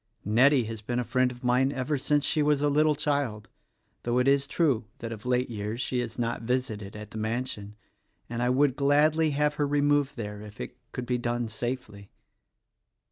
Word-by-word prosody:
Nettie 125 +6 +5
has 110 -1 -6
been 120 +3 -3
a 125 - +1
friend 130 +1 +1
of 125 +1 -12
mine 125 +2 +3
ever 135 +2 -1
since 145 +1 +1
she 155 - +2
was 145 -1 +2
a 145 - +3
little 150 +1 +3
child 140 -8 -1 0.5
(though 120 +1 0
it 125 +1 +3
is 140 0 +3
true 135 -9 +1
that 115 -1 -6
of 110 +1 -7
late 125 0 +2
years 105 +1 -4
she 125 0 -1
has 120 -2 -4
not 120 -1 -1
visited 115 -5 -2
at 105 0 -9
the 110 - -5
mansion), 110 -2 -3 0.5
and 120 0 -4
I 125 - +2
would 130 +1 +3
gladly 150 +3 +3
have 150 0 +2
her 145 - +2
removed 145 -1 +2
there 105 -2 -5
if 105 0 -11
it 60 - -6 0.2
could 125 - -4
be 125 0 0
done 120 0 -1
safely." 110 -3 -5
125 Hz, 195 wpm, -28 LUFS, 115-140 Hz, 0.5 s, Nettie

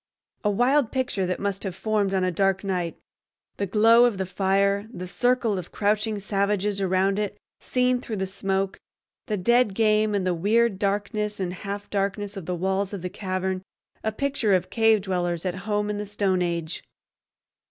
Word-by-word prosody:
A 210 - +2
wild 245 +5 +3
picture 245 -8 -1
that 180 - -2
must 200 -1 -2
have 190 -3 -4
formed 205 0 0
on 190 - +1
a 185 - +1
dark 195 +2 +1
night—the 185 +2 -5
glow 225 +4 +6
of 235 -5 +1
the 190 - -1
fire, 200 +2 +1
the 180 -6 -6
circle 235 +1 +1
of 175 - -9
crouching 210 +1 +1
savages 200 0 0
around 190 +1 +2
it 205 -1 -2 0.2
seen 250 0 +1
through 225 - -5
the 190 -1 -1
smoke, 195 0 -2 0.5
the 215 -3 -1
dead 235 +2 +3
game, 215 -1 +3
and 195 -2 0
the 180 - +2
weird 205 +4 +2
darkness 205 +1 -1
and 180 -2 -2
half 200 +3 -6
darkness 200 +1 -1
of 190 -5 -7
the 180 - -1
walls 190 +3 -1
of 190 -3 -5
the 180 - -3
cavern, 185 -1 -2 0.4
a 220 - 0
picture 240 -4 +1
of 185 0 -1
cave 225 -2 +4
dwellers 175 -3 -1
at 180 - 0 0.2
home 210 0 +1
in 210 0 -2
the 210 - -4
stone 195 -2 0
age! 170 -2 -2
200 Hz, 180 wpm, -25 LUFS, 190-215 Hz, 0.5 s, glow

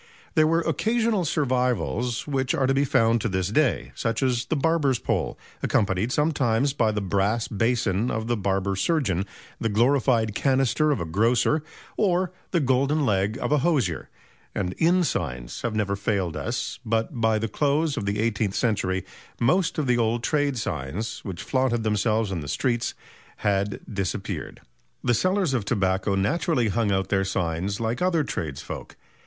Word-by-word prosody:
There 155 -2 +4
were 165 +1 +2
occasional 220 0 +1
survivals 125 - 0
which 135 -3 0
are 135 - +1
to 135 - +2
be 140 +1 +2
found 115 -3 +3
to - - -1
this 95 -1 -1
day, 140 +4 +1
such 115 +2 -1
as 125 -2 +1
the - - -1
barber's 150 -3 +2
pole, - - -2 0.2
accompanied 100 +3 +1
sometimes 140 -4 +1
by 115 -6 +2
the 105 -1 -2
brass 100 +4 0
basin 115 -1 0
of 110 0 -2
the 120 +1 0
barber 100 -1 0
surgeon, 100 - 0 0.3
the 115 - 0
glorified 115 -1 +2
canister 135 +5 +2
of 140 -7 +1
a 85 - -2
grocer 115 - +2 0.4
or 185 -3 +2 0.2
the 170 - +1
golden 140 +2 +2
leg 105 0 +1
of - - -2
a 150 - +4
hosier; 130 - 0 0.5
and 90 - -1
inn 175 +2 +4
signs 60 - -3
have 120 -2 -2
never 100 -2 0
failed 100 -4 -1
us; 120 +1 -3
but 115 +1 -1
by 110 -1 +3
the 115 +1 -1
close 145 +5 +1
of 105 -8 -3
the 100 +1 -1
eighteenth 110 -3 0
century 95 -5 0 0.3
most 170 +10 +2
of 155 - 0
the 125 -1 +2
old 115 +1 +1
trade 145 -2 +1
signs 90 - -3
which 95 -4 -6
flaunted 130 -3 0
themselves 110 0 +1
in 90 - -2
the 75 - -7
streets 120 - -1 0.5
had 100 0 +1
disappeared. 95 -3 -4 0.4
The 120 - +2
sellers 185 - +1
of 120 -5 0
tobacco 95 -2 0
naturally 125 - +1
hung 110 0 +1
out 95 -1 0
their 95 -1 +2
signs 95 +1 -2
like 115 +1 -2
other 175 -4 +2
tradesfolk. 75 - -5
115 Hz, 165 wpm, -25 LUFS, 100-140 Hz, 0.5 s, There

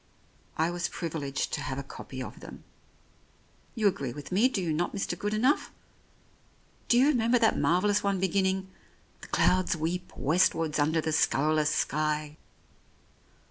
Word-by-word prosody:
I 160 +2 +1
was 175 0 -2
privileged 150 -5 -3
to 150 - -2
have 135 -2 -4
a 140 - -4
copy 130 -1 -8
of - - -9
them. - - -11 1.1
You 215 -2 +2
agree 140 -10 -1
with 145 +3 -9
me, 215 +8 +4
do 240 - -2
you 170 -4 -1
not, 175 +5 -1
Mr. 195 - -2
Good 205 - -3
enough? 255 +7 +1 1.2
Do 240 - +4
you 260 +3 +5
remember 245 -3 +3
that 225 -2 +2
marvellous 205 +4 +2
one 200 -2 0
beginning, 190 0 0 0.2
' - - -34
The - - -10
clouds 185 -1 +2
weep 175 +3 -3
westwards 160 0 +2
under 160 +2 +2
the 160 - -2
scurrilous 155 0 +2
sky 150 0 -1
170 Hz, 155 wpm, -28 LUFS, 150-200 Hz, 1.2 s, you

